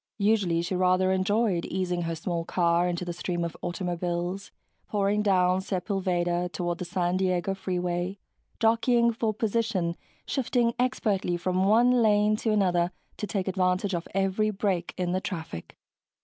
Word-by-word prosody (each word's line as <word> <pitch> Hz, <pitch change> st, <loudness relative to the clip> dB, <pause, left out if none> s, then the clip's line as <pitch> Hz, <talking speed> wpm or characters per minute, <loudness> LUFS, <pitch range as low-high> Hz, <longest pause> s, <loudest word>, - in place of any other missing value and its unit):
Usually 200 Hz, -6 st, +2 dB
she 175 Hz, -, -3 dB
rather 185 Hz, +1 st, +3 dB
enjoyed 190 Hz, -1 st, +1 dB
easing 180 Hz, -1 st, -2 dB
her 165 Hz, -1 st, -2 dB
small 170 Hz, +1 st, -3 dB
car 170 Hz, 0 st, +2 dB
into 175 Hz, 0 st, -2 dB
the 175 Hz, -, -3 dB
stream 175 Hz, 0 st, -3 dB
of 170 Hz, -, -4 dB
automobiles 175 Hz, +1 st, -3 dB, 0.4 s
pouring 205 Hz, 0 st, +1 dB
down 185 Hz, -2 st, +3 dB
Sepulveda 180 Hz, -2 st, -1 dB
toward 175 Hz, -1 st, -2 dB
the 180 Hz, -, -3 dB
San 175 Hz, 0 st, 0 dB
Diego 185 Hz, 0 st, 0 dB
Freeway, 180 Hz, 0 st, -2 dB, 0.4 s
jockeying 235 Hz, +1 st, +3 dB
for 225 Hz, -1 st, 0 dB
position, 215 Hz, -5 st, -1 dB, 0.3 s
shifting 245 Hz, -3 st, +1 dB
expertly 205 Hz, -8 st, 0 dB
from 185 Hz, +2 st, 0 dB
one 240 Hz, +4 st, +4 dB
lane 210 Hz, -1 st, +4 dB
to 225 Hz, -, -2 dB
another 180 Hz, -4 st, +2 dB, 0.3 s
to 210 Hz, -, -4 dB
take 195 Hz, -2 st, -2 dB
advantage 185 Hz, +1 st, +1 dB
of 170 Hz, -1 st, -3 dB
every 195 Hz, +2 st, +1 dB
break 190 Hz, -4 st, -1 dB
in 180 Hz, -1 st, -1 dB
the 185 Hz, +1 st, 0 dB
traffic. 160 Hz, -, -6 dB
185 Hz, 150 wpm, -27 LUFS, 175-210 Hz, 0.4 s, one